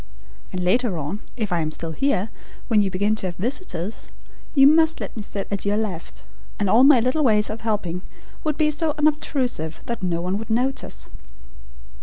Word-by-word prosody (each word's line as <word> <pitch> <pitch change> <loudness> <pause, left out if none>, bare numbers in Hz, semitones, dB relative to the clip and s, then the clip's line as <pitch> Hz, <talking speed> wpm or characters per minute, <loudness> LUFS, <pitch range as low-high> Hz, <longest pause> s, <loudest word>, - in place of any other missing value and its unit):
And 180 -1 -3
later 200 +1 +2
on, 155 +7 -3 0.2
if 215 -5 -2
I 175 - +2
am 155 -1 0
still 165 +1 -4
here, 225 - 0 0.4
when 215 -3 +5
you 200 - +1
begin 200 +3 +1
to 190 - -2
have 175 - -5
visitors, 215 - -3 0.5
you 275 -1 +7
must 320 +2 +5
let - - -6
me 220 - -4
sit 200 -1 -4
at 200 - -2
your 205 +1 +1
left, 195 -7 -4 0.3
and 205 - 0
all 225 +7 +6
my 275 -2 +8
little 255 +6 +1
ways 210 -4 +3
of 220 - -6
helping 200 -6 -2 0.4
would 305 -2 -1
be 305 -1 +3
so 305 0 -1
unobtrusive, 270 - 0
that 235 -3 -4
no 175 -2 0
one 180 +3 -1
would 225 - -7
notice." 255 +4 -1
215 Hz, 190 wpm, -23 LUFS, 185-270 Hz, 0.5 s, my